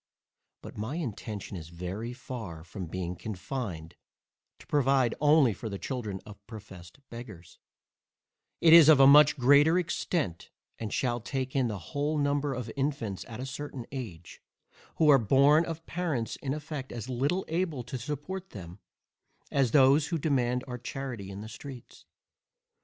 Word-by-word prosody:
But - - -9
my 110 +8 -3
intention 110 - -5
is 80 -3 -8
very 90 +7 -5
far 115 -10 -7
from 90 +1 -7
being 90 +1 -4
confined 90 -4 -6 0.6
to - - -16
provide 135 -4 +2
only 150 -5 +5
for 110 +4 -6
the 100 - -4
children 110 -5 -4
of 100 -1 -13
professed 100 -4 -11
beggars: 110 -8 -10 1.0
it 165 -1 +7
is 165 -2 +10
of 150 -3 +7
a 135 - +8
much 145 +2 +7
greater 145 +6 +5
extent, 170 - -2 0.3
and 110 -3 -4
shall 120 -2 0
take 130 +3 -4
in 130 -3 +2
the 105 -3 -3
whole 145 - -2
number 145 -1 0
of 120 -2 -5
infants 135 -8 -2
at 115 -1 -8
a 130 - -4
certain 135 -2 -6
age, 100 -11 -8 0.5
who 160 - +3
are 140 -2 +8
born 140 +8 +4
of 165 0 -6
parents 160 -10 -2
in 135 0 -3
effect 150 -3 -6
as 120 0 -6
little 140 +9 -1
able 165 -6 -2
to 125 +2 -6
support 150 +9 -5
them, 90 -2 -10 0.7
as 135 -3 +2
those 140 +3 +5
who 170 - -1
demand 125 -5 0
our 125 -1 -6
charity 120 -7 -6
in 100 +1 -7
the 110 - -7
streets. 125 +2 -11
130 Hz, 160 wpm, -29 LUFS, 105-145 Hz, 1.0 s, is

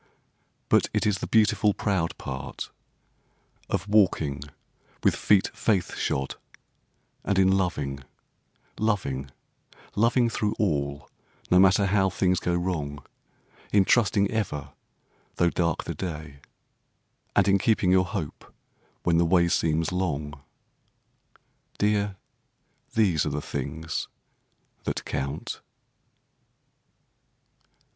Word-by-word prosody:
But - - +3
it - - +1
is 105 -2 +1
the - - -4
beautiful 105 -2 +3
proud 95 -6 -1
part 65 +1 -6 1.0
Of - - -1
walking 85 -9 +2 0.6
with - - +4
feet 100 -2 +3
faith 100 -6 0
shod; 70 0 -2 0.9
And 100 - 0
in 95 0 +5
loving, 75 -7 -2 0.8
loving, 70 -12 -1 0.7
loving 115 +3 +3
through 105 -2 -1
all, 70 -7 -1 0.4
no 90 - +6
matter 95 +1 +5
how 95 0 +3
things 90 -1 +1
go 85 - 0
wrong; 80 -5 -3 0.7
In 100 -2 +4
trusting 100 -3 +3
ever, 75 -11 -3 0.6
though 85 -1 +2
dark 85 -3 0
the - - -4
day, 75 -6 -6 1.0
and - - +4
in 100 0 +4
keeping 100 -3 +2
your 95 0 +4
hope 90 -5 -6 0.5
when 85 -1 +3
the - - +5
way 85 0 +4
seems 80 0 +1
long— 75 -6 -2 1.4
Dear, 105 -1 +1 0.8
these 95 -9 +3
are - - -1
the 75 +1 -2
things 75 +3 -4 0.8
that - - -3
count. 70 +2 -4
90 Hz, 105 wpm, -26 LUFS, 75-100 Hz, 1.4 s, no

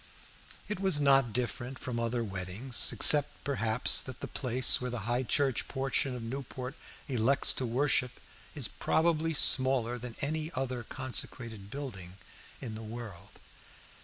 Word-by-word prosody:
It 210 -3 -4
was 190 -6 +5
not 135 -4 +4
different 125 +2 -2
from 125 -2 -4
other 115 0 -1
weddings, 100 +5 -1
excepting 145 -2 +4
perhaps 115 -4 +1
that 130 -2 -9
the - - -5
place 130 -1 +4
where 125 - -3
the 120 -2 -4
High 120 +2 +1
Church 135 0 +1
portion 135 -1 -1
of 120 - -6
Newport 130 +1 -6 0.3
elects 130 +1 +2
to 130 - -3
worship 125 0 +1 0.4
is - - +1
probably 165 -1 +1
smaller 130 -4 +3
than 120 -1 -8
any 155 +3 -2
other 130 -2 -2
consecrated 115 -4 -4
building 100 -10 -7 0.4
in 115 -4 -6
the 110 - -7
world. 110 -4 -9
125 Hz, 140 wpm, -31 LUFS, 115-135 Hz, 0.4 s, was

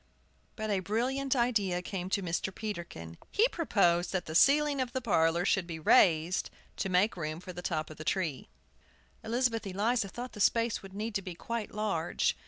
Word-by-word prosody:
But 215 -2 -3
a 200 - +2
brilliant 255 +8 0
idea 210 -8 +1
came 185 -2 -4
to 195 0 0
Mr. 175 +2 -2
Peterkin. 170 - -6
He 440 +4 +4
proposed 180 - +2
that 180 -2 -1
the 155 - -6
ceiling 285 - +4
of 245 -1 -3
the 260 - 0
parlor 170 -6 +2
should 195 -3 +1
be 165 -2 -5
raised 160 +2 +4 0.3
to 195 - -2
make 185 +4 +3
room 155 -2 -4
for 180 +1 -9
the 175 - -7
top 155 -3 -2
of 155 - -11
the 155 - -7
tree. 160 - -2 0.7
Elizabeth 230 -1 0
Eliza 205 +3 0
thought 245 +5 -7
the 210 - -9
space 230 +2 +2
would 195 0 -12
need 215 +2 -3
to 195 - -1
be 185 -2 -7
quite 230 +4 -4
large. 200 -6 0
195 Hz, 190 wpm, -31 LUFS, 175-230 Hz, 0.7 s, He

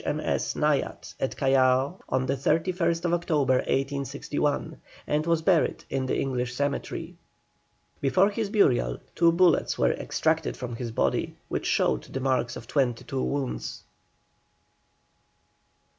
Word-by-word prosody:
M.S. - - -1
Naiad - - -1
at - - -2
Callao 135 +4 +3
on 130 0 +1
the 135 +2 0
31st 170 +4 +1
October, 155 -6 +2
1861, 140 +3 -2 0.2
and 150 +2 0
was 165 -1 +2
buried 170 -2 +2
in 130 -1 -1
the - - 0
English 125 -2 -2
cemetery. 140 +1 -3 0.9
Before 180 +9 +3
his 210 0 -2
burial 125 - +2 0.2
two 170 -1 +4
bullets 175 0 +3
were - - +3
extracted 160 -1 -1
from 120 -2 -5
his 120 -1 -4
body, 70 - 0
which - - -2
showed 65 -1 +2
the 135 - -5
marks 130 -2 0
of - - -8
twenty 125 -5 0
two 135 -1 -3
wounds. 140 -2 -3
140 Hz, 130 wpm, -27 LUFS, 130-165 Hz, 0.9 s, two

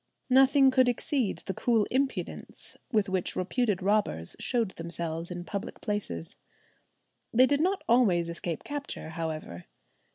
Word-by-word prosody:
Nothing 270 +1 +6
could 255 -1 +4
exceed 245 -2 -1
the 190 - -2
cool 225 -2 +2
impudence 270 +1 -3 0.2
with 215 -4 +2
which 190 -2 -1
reputed 200 0 0
robbers 195 - 0
showed 230 -6 0
themselves 165 -1 -4
in 175 -1 -5
public 200 +1 -5
places. 200 - -3 0.9
They 250 +3 +6
did 285 +2 +2
not 375 +3 +1
always 200 -9 +4
escape 170 -1 -4
capture, 285 - -5
however. 155 - -5
205 Hz, 130 wpm, -29 LUFS, 170-255 Hz, 0.9 s, Nothing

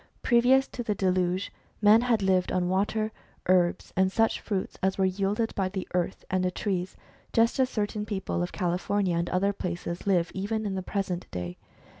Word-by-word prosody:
Previous 255 +3 +4
to 245 - -5
the 215 -3 -1
deluge 185 0 0 0.3
men 215 +2 +6
had 235 -4 +1
lived 185 -1 +2
on 180 -1 +1
water, 210 +3 0 0.3
herbs, 180 -1 +2
and 190 0 +3
such 225 +2 +2
fruits 195 -4 -3
as 190 0 +1
were 190 - +3
yielded 200 +4 0
by 190 -2 0
the 190 -1 -5
earth 180 -1 -1
and 185 0 +1
the 185 - +2
trees, 185 0 -3 0.4
just 230 +3 +3
as 260 -1 +3
certain 210 -2 -2
people 190 -4 -2
of 175 - -2
California 180 0 0
and 170 +1 -1
other 195 +2 +1
places 175 -1 -4
live 180 -3 +2
even 215 +3 -2
in 200 - -2
the 190 - -2
present 185 -2 -3
day. 90 0 -5
190 Hz, 185 wpm, -28 LUFS, 180-210 Hz, 0.4 s, men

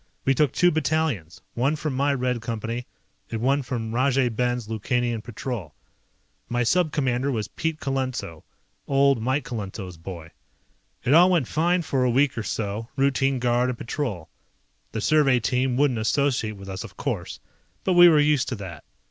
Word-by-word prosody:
We 135 - +4
took 140 0 +2
two 175 0 +3
battalions, 155 - -1
one 135 +6 +1
from 155 -2 -3
my 140 +2 +1
Red 125 -2 -1
Company, 115 +1 -4 0.4
and 115 - -3
one 135 +4 +2
from 115 -3 -4
Rajay 130 0 +2
Ben's 120 0 -1
Lukanian 115 +1 -1
Patrol. 115 - -6 0.7
My 120 0 +1
Sub 170 +6 +2
Commander 135 -1 0
was 110 -5 -2
Pete 160 -1 -3
Colenso, 130 - -3 0.4
old 140 -3 +3
Mike 130 +4 0
Colenso's 100 -6 -6
boy. 85 -1 -9 0.7
It 130 - +2
all 175 +3 +7
went 170 -9 +2
fine 175 +3 +1
for 135 -4 0
a 125 - +3
week 135 +3 +2
or 115 - -2
so, 105 +2 -3
routine 135 0 +2
guard 125 0 +1
and 125 - -3
patrol. 115 - -4 0.6
The 110 - -3
survey 140 -2 +4
team 125 +2 0
wouldn't 135 -5 +2
associate 110 -2 0
with 100 0 -10
us, 95 0 -5
of - - -12
course, - - -4 0.4
but 185 - +2
we 175 0 +9
were 155 -2 +5
used 145 -2 +2
to 130 - -2
that. 95 -5 -8
125 Hz, 170 wpm, -24 LUFS, 115-140 Hz, 0.7 s, we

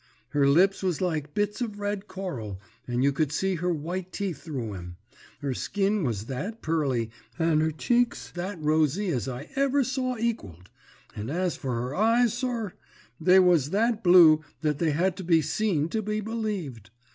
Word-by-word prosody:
Her 140 0 +2
lips 185 +7 +4
was 185 -5 0
like 155 -5 -2
bits 210 +3 -1
of 210 -4 -3
red 205 0 -3
coral, 135 - -5 0.3
and 120 +1 0
you 140 - +4
could 145 +1 0
see 190 +6 0
her 180 +2 0
white 175 +4 -4
teeth 185 -8 -4
through 130 -10 -4
'em; 90 -2 -8 0.5
her 140 -2 -1
skin 200 - 0
was 110 -6 -2
that 185 - -5
pearly 135 -8 0 0.3
and 160 -2 +2
her 160 - +2
cheeks 240 +10 0
that 180 +1 -5
rosy 155 +5 +1
as 125 - -1
I 130 +3 -6
never 275 0 +2
saw 255 -1 -2
equalled; 100 - -4 0.4
and 105 +3 -5
as 180 +3 -1
for 130 -3 -3
her 125 +3 -3
eyes, 230 +5 +3
sir, 240 -5 -2 0.5
they 180 +4 +5
was 175 -7 +4
that 225 +4 +1
blue 170 -4 +7 0.2
that 150 -2 0
they 165 - +2
had 175 +5 +1
to 190 - -5
be 165 -1 +4
seen 155 -1 0
to 220 - -1
be 215 +1 -2
believed. 205 - -4
175 Hz, 180 wpm, -27 LUFS, 145-205 Hz, 0.5 s, blue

